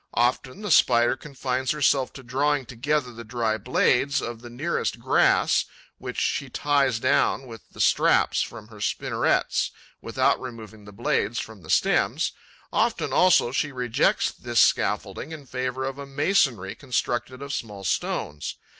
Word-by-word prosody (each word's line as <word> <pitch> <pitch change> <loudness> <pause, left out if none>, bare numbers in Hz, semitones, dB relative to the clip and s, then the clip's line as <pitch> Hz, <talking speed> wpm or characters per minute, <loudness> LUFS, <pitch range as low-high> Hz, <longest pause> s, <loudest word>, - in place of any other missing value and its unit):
Often, 130 - 0
the 205 - -2
Spider 120 -4 +5
confines 130 -2 -3
herself 140 -3 +2
to 135 - -11
drawing 140 +3 0
together 125 +2 -1
the 115 +1 -9
dry 110 -1 -1
blades 130 +5 +2
of 120 -2 -6
the 120 - -10
nearest 145 +9 -2
grass, - - +3 0.3
which - - -5
she - - -1
ties 140 -4 +1
down 130 +2 +1
with 115 -3 -12
the - - -16
straps - - +3
from 105 0 -6
her 105 -2 -12
spinnerets, - - 0 0.3
without - - +1
removing 110 -4 -9
the 105 - -11
blades 100 +2 -1
from 110 -3 -6
the 75 - -14
stems; - - +2 0.4
often, - - 0
also, 180 -9 +4
she 145 +2 -1
rejects 125 -3 +1
this - - -2
scaffolding - - +1
in 155 -3 -8
favour 130 0 -3
of 135 +1 -5
a 140 - -7
masonry 135 - +1
constructed 125 -1 -3
of 140 0 -5
small 105 -4 -5
stones. 75 -4 -2
125 Hz, 150 wpm, -25 LUFS, 115-140 Hz, 0.4 s, Spider